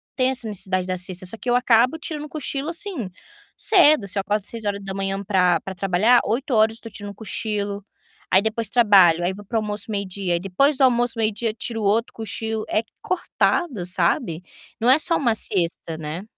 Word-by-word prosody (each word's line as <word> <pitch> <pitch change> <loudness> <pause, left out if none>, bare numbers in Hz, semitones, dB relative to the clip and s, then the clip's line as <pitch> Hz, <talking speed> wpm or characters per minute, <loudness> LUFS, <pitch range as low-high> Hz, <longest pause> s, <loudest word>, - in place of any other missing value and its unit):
tenho 255 0 +2
essa 245 -3 -3
necessidade 185 -3 -1
da 185 - -1
siesta, 185 0 -3
só 185 - -2
que 245 - -5
eu 245 - +3
acabo 245 +4 +3
tirando 310 -2 -5
um 300 - -9
cochilo, 290 0 -4
assim, 335 - -3 0.5
cedo. 310 - +4
Se 200 - -1
eu 195 - +2
acordo 205 0 -2
6h 195 -3 -4
pra 180 -4 +2
pra 190 - -7
trabalhar, 195 +6 +3
08h 225 -2 +1
eu - - -11
tô 225 - -7
tirando 205 -1 -7
um - - -11
cochilo, 205 -1 -4 0.5
aí 190 - +5
depois 220 0 -2
trabalho, 195 -8 +5
aí 185 - 0
vou 205 +2 -11
pro 230 - -2
almoço 210 0 -1
meio-dia, 195 -2 -2
aí 170 - +1
depois 195 - +1
do 270 - +2
almoço 245 -2 +3
meio-dia 220 0 -1
tiro 225 0 -4
outro 215 +4 +1
cochilo. 220 0 -4
É 215 - +1 0.2
cortado, 335 - -1
sabe, 175 -2 0 0.4
não 235 +2 +2
é 260 - +7
só 335 +1 +3
uma 235 -6 +1
siesta, 170 -5 0
né. 160 +3 -6
215 Hz, 190 wpm, -22 LUFS, 190-240 Hz, 0.5 s, é